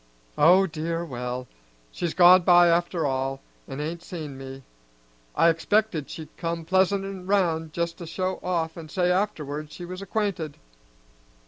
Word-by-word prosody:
Oh 180 +5 +6
dear, 165 0 -3
well; 125 -2 -5 0.4
she's 170 -2 -3
gone 180 0 +8
by 175 0 +6
after 170 -1 +1
all, 135 0 -1 0.3
an' 135 +1 -6
ain't 165 +3 -4
seen 160 -6 -7
me. 135 0 -9 0.7
I 170 - +5
expected 170 -1 0
she'd 160 -2 -9
come 165 -1 -3
pleasantin' 190 +1 0
round 165 -5 +1
just 170 +1 -3
to 170 - -7
show 185 +3 -2
off 170 -3 -2
an' 160 -2 -9
say 180 +2 +1
afterwards 155 -6 -2
she 175 - -8
was 185 +2 -7
acquainted." 195 -7 -2
170 Hz, 145 wpm, -25 LUFS, 155-185 Hz, 0.7 s, gone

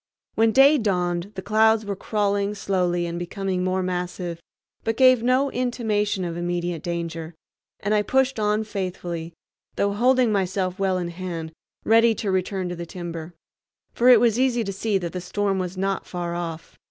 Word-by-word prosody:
When 225 0 +3
day 280 +4 +6
dawned 180 -3 -1
the 190 - -5
clouds 220 0 +3
were 200 -1 -3
crawling 205 0 -1
slowly 180 -3 0
and 170 0 -4
becoming 185 +1 -2
more 185 0 0
massive, 180 -1 -3 0.4
but 225 0 -1
gave 255 -2 +6
no 255 +3 +2
intimation 215 -6 -1
of 170 -1 -4
immediate 175 -1 -2
danger, 170 -1 -4 0.5
and 205 +2 0
I 210 - +4
pushed 265 +2 +1
on 210 +1 +1
faithfully, 180 -5 -5 0.4
though 200 0 +1
holding 250 +2 +3
myself 190 -2 -1
well 190 -1 +1
in 175 -1 -3
hand, 170 -2 -5 0.3
ready 230 0 +5
to 200 -1 -2
return 185 0 -1
to 175 - -4
the 170 0 -7
timber; 170 -1 -7 0.6
for 245 +2 +4
it 245 -3 +9
was 235 0 +3
easy 250 -3 +2
to 195 -2 -4
see 205 +1 0
that 175 -3 -4
the 180 - -4
storm 195 +1 -1
was 185 0 -4
not 195 0 -1
far 175 -1 -4
off. 170 -2 -6
190 Hz, 175 wpm, -24 LUFS, 175-220 Hz, 0.6 s, it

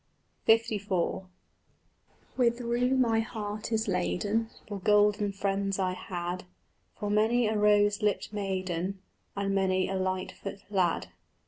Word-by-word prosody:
LIV 220 -3 +3 1.4
With 235 -1 +2
rue 245 +2 +1
my 230 -3 +3
heart 215 -1 -4
is 220 0 +1
laden 205 +4 0 0.2
For 205 -2 -5
golden 210 0 +3
friends 195 0 -1
I 185 -2 0
had, 180 0 -4 0.5
For 205 -1 -3
many 225 +3 +3
a 215 0 +1
rose 205 0 +4
lipt 210 0 0
maiden 190 -2 -2 0.4
And 200 -1 -1
many 190 -1 +2
a 195 - -3
lightfoot 185 +1 -3
lad. 175 - +1
205 Hz, 120 wpm, -29 LUFS, 190-220 Hz, 1.4 s, rose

